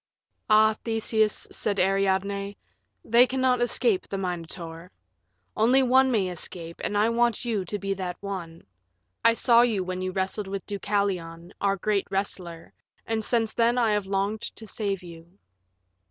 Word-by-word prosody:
"Ah, 215 0 +6
Theseus," 220 -1 0
said 200 -1 -1
Ariadne, 195 +1 0 0.5
"they 240 +3 +6
cannot 255 -1 +1
escape 240 -4 +1
the 195 - -4
Minotaur. 170 -2 -5 0.6
One 225 +4 +2
only 260 +1 +5
may 205 -7 +1
escape, 170 -1 -8
and 205 - -1
I 210 +2 +4
want 235 0 +1
you 220 -5 -1
to 205 +4 -3
be 195 0 -2
that 185 -2 -5
one. 180 -5 -7 0.6
I 230 0 +5
saw 235 -1 +5
you 225 -6 +2
when 185 0 -4
you 185 0 -2
wrestled 190 +2 -2
with 195 -1 -5
Deucalion, 185 -4 -2
our 200 -1 +2
great 200 +1 0
wrestler, 180 -4 -4 0.3
and 225 -1 -1
since 225 -1 0
then 235 +1 +2
I 230 -3 +3
have 210 -2 0
longed 200 +2 -1
to 225 - -6
save 200 -2 -3
you." 170 +1 -13
200 Hz, 155 wpm, -26 LUFS, 185-225 Hz, 0.6 s, Ah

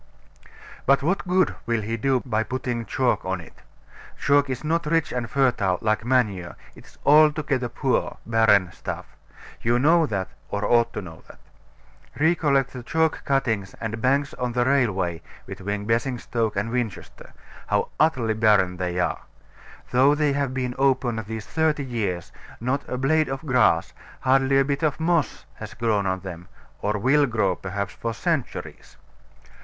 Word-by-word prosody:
But 140 +1 +4
what 185 +4 0
good 185 0 +2
will 115 -1 +1
he 115 +2 -2
do 130 +2 0
by 110 -3 0
putting 120 -1 -3
chalk 130 -2 +1
on 95 0 -2
it? 85 - -14 0.6
Chalk 145 0 +3
is 130 +1 -4
not 165 +1 0
rich 165 0 +1
and 120 -2 -3
fertile, 115 -8 +2
like 110 -1 0
manure, 110 -8 0 0.2
it - - -15
is - - -20
altogether 150 -4 +4
poor, - - -1
barren 110 -5 +3
stuff: - - -7 0.5
you 120 +1 +2
know 160 +5 +4
that, 95 -4 -2 0.2
or 100 0 -2
ought 120 -1 +3
to - - -4
know 80 -3 -11
it. - - -13 0.8
Recollect 145 -4 +2
the 125 - -6
chalk 160 +6 0
cuttings 110 -8 0
and 110 0 -4
banks 140 +3 +1
on 125 -1 -3
the 120 0 +1
railway 100 -11 +1 0.2
between 100 +2 -4
Basingstoke 115 -1 -1
and 105 +4 -2
Winchester 120 -6 -5 0.3
how - - 0
utterly 130 -8 +2
barren 105 -5 +3
they 90 0 -2
are. 90 - 0 0.7
Though 135 +4 +5
they 150 -1 +1
have 140 -2 -1
been 130 -1 -2
open 125 -4 +1
these 110 -1 -5
thirty 155 -3 0
years, 100 -9 -3 0.3
not 130 +4 -1
a 125 - -2
blade 155 +4 +2
of 135 +3 -5
grass, 125 - +2 0.3
hardly 135 +1 +3
a 135 - +4
bit 140 0 -1
of 155 -2 0
moss, 160 -5 0
has 110 0 -8
grown 110 -4 0
on 95 0 -1
them, 90 -2 -8 0.3
or 105 +1 0
will 140 +7 +3
grow, 110 -6 +1
perhaps, 100 +2 -4
for 115 -1 -4
centuries. 160 0 -4
125 Hz, 160 wpm, -24 LUFS, 105-140 Hz, 0.8 s, Though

